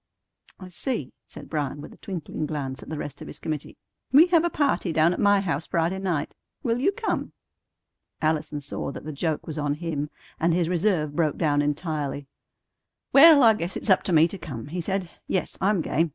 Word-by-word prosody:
"I 185 -1 -9
see," 180 - -3
said - - -10
Bryan, 145 -2 -3
with 145 - -9
a - - -17
twinkling 165 -4 -5
glance 135 -4 -4
at - - -11
the 155 - -4
rest 145 - -6
of - - -8
his - - -7
committee. 155 -2 -5 0.3
"We 290 +6 +8
have 335 -2 +4
a 345 - +2
party 280 - 0
down 160 +2 +3
at - - -5
my 205 -1 +4
house 165 -5 -2
Friday 170 +3 0
night. 175 -6 -2 0.3
Will 235 -2 0
you 330 +10 +3
come?" 445 +3 -3 0.9
Allison 155 -1 -1
saw 140 0 -4
that - - -8
the 155 - -4
joke 155 +1 -2
was 155 -1 -4
on 145 -1 0
him, 150 -2 -3 0.3
and 165 +1 +2
his 170 -2 +1
reserve 170 -5 +1
broke 155 -3 +1
down 145 -3 +2
entirely. 145 -1 -2 0.9
"Well, 290 0 +9
I 225 -1 +8
guess 180 -3 -4
it's 210 - -1
up 190 - +5
to - - -1
me 160 0 +6
to 195 - -8
come," 135 -6 -7
he 175 +3 -3
said. 190 +1 -1 0.2
"Yes, 185 - -1
I'm 195 -2 +2
game. 165 +2 +1
165 Hz, 205 wpm, -25 LUFS, 150-195 Hz, 0.9 s, Well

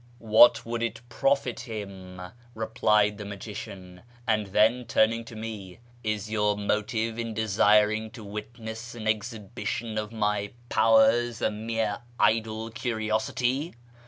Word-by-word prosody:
" 120 - -27 0.2
What 120 +2 +8
would 115 0 -3
it 115 -1 -2
profit 135 +1 +1
him? 100 -6 -7 0.2
" 120 0 -27
replied 105 -1 +2
the 105 - -6
magician; 95 -3 -8 0.2
and 110 -3 +1
then, 110 +5 +3
turning 115 0 +2
to 115 - -10
me, 110 -4 -7
" - - -27
Is 110 -1 -2
your 105 -1 +1
motive 110 +2 -1
in 115 -1 -3
desiring 105 +1 +3
to 115 - -9
witness 110 +3 -7
an 110 -2 -5
exhibition 110 0 -2
of 105 0 -5
my 105 -2 -1 0.2
powers 115 +1 +4
a - - +1
mere 110 -1 -2 0.2
idle 110 0 +1
curiosity 120 +5 -1
110 Hz, 135 wpm, -27 LUFS, 105-115 Hz, 0.2 s, What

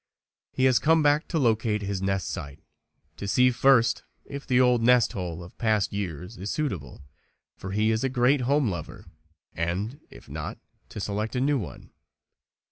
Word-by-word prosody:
He 130 - -1
has 130 -3 +5
come 160 0 +3
back 145 +1 +3
to 170 - -2
locate 110 -5 +1
his 100 -1 -3
nest 95 -1 -1
site 70 0 -7 0.6
to 100 - -5
see 125 +5 +4
first 120 -2 +4 0.2
if 140 0 -8
the 125 -2 +3
old 125 -2 +4
nest 125 0 +4
hole 90 -3 -5
of 85 - -13
past 110 -5 +1
years 90 0 -5
is 100 +3 -4
suitable, 90 - -4 0.5
for 95 - -8
he 105 +3 +1
is 110 +2 0
a 135 - +1
great 130 +2 +3
home 140 +2 +2
lover, 85 -4 -7 0.5
and, 95 - -3
if - - -15
not, - - -6 0.3
to - - -7
select 105 +3 -3
a - - +1
new 140 +1 +2
one. 100 - -9
110 Hz, 175 wpm, -26 LUFS, 95-130 Hz, 0.6 s, has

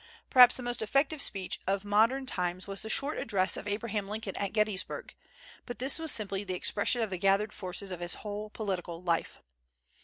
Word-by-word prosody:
Probably 250 -1 +8
the 255 - -4
most 240 -1 -1
effective 275 +7 0
speech 195 -7 0
of 195 +1 -1
modern 225 +6 +2
times 180 -5 -3
was 195 0 -3
the 220 - -6
short 280 +7 +1
address 195 -3 +1
of - - -5
Abraham 205 -1 -3
Lincoln 215 -2 -5
at 200 -1 -3
Gettysburg; 215 -3 -1 0.5
but 245 -3 -6
this 265 +6 +5
was 320 -1 +6
simply 200 -2 0
the 185 -2 -4
expression 215 +6 +1
of 215 - -4
the 185 - -4
gathered 200 +2 +2
forces 190 +1 -6
of 180 - -6
his 175 0 -2
whole 210 0 -6
political 180 -5 -5
life. 170 -2 -2
205 Hz, 190 wpm, -30 LUFS, 190-230 Hz, 0.5 s, Probably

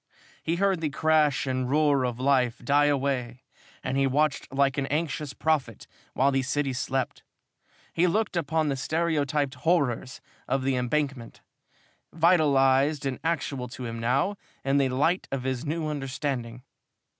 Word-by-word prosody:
He 165 - -1
heard 190 -1 +1
the 155 - 0
crash 150 -1 +2
and 130 -1 -1
roar 145 -2 +3
of 125 -1 -3
life 130 -3 +2
die 145 +1 +4
away 135 -4 -1 0.4
and 130 +1 -1
he 135 0 +3
watched 145 +2 0
like 135 +1 +1
an 135 - -2
anxious 150 -1 -2
prophet 140 -9 -1 0.3
while 135 +2 +3
the 135 0 +1
city 140 +1 -1
slept. 130 0 -2 0.7
He 175 +2 +3
looked 210 +3 0
upon 160 -1 0
the 140 - 0
stereotyped 150 -2 0
horrors 140 -7 0 0.3
of 135 -1 0
the 135 0 +1
Embankment, 130 -1 -2 0.7
vitalized 145 -4 +3
and 135 -2 -2
actual 145 -6 -2
to 125 +1 -8
him 115 0 -5
now 135 - +1 0.3
in 135 +1 +3
the 135 -1 +2
light 155 +8 +1
of 135 -2 -2
his 130 0 -2
new 160 +1 -2
understanding. 135 -4 -4
140 Hz, 150 wpm, -27 LUFS, 130-155 Hz, 0.7 s, die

